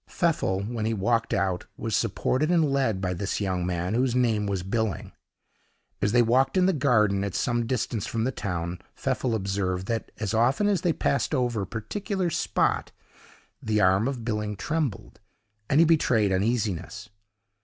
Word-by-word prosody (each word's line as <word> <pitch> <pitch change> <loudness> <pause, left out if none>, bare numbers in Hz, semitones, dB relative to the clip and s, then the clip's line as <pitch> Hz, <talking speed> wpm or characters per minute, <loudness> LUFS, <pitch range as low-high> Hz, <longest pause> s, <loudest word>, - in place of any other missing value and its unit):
Pfeffel, 150 - 0
when 110 0 -3
he 115 - 0
walked 115 +3 0
out, 95 -2 -1
was - - -2
supported 150 +5 0
and 165 -5 +3
led 130 -8 +1
by 90 -1 -1
this 95 +3 -2
young 95 -3 -1
man, 90 +2 -2
whose 125 +1 +1
name 115 -5 +2
was 95 -3 -2
Billing. 110 0 -2 0.9
As 105 - +2
they 120 +1 +5
walked 130 +9 +2
in 185 - +4
the 190 - +3
garden, 105 - +2
at 100 -2 -3
some 120 -1 0
distance 120 -4 -2
from 115 -1 -2
the 130 - 0
town, 90 -6 -4 0.2
Pfeffel 120 -3 -1
observed, 95 -2 -2
that 115 +1 -3
as 110 -1 -2
often 125 - +2
as 200 -5 +1
they 175 - +2
passed 150 -1 0
over 120 -5 0
a 95 - -4
particular 180 - -3
spot, - - 0 0.7
the 110 -1 0
arm 95 +3 +3
of 125 -5 -4
Billing 105 -2 -2
trembled, 145 - -3 0.5
and 140 - +4
he 165 - +7
betrayed 125 -11 +3
uneasiness. 105 0 -1
110 Hz, 170 wpm, -26 LUFS, 100-130 Hz, 0.9 s, he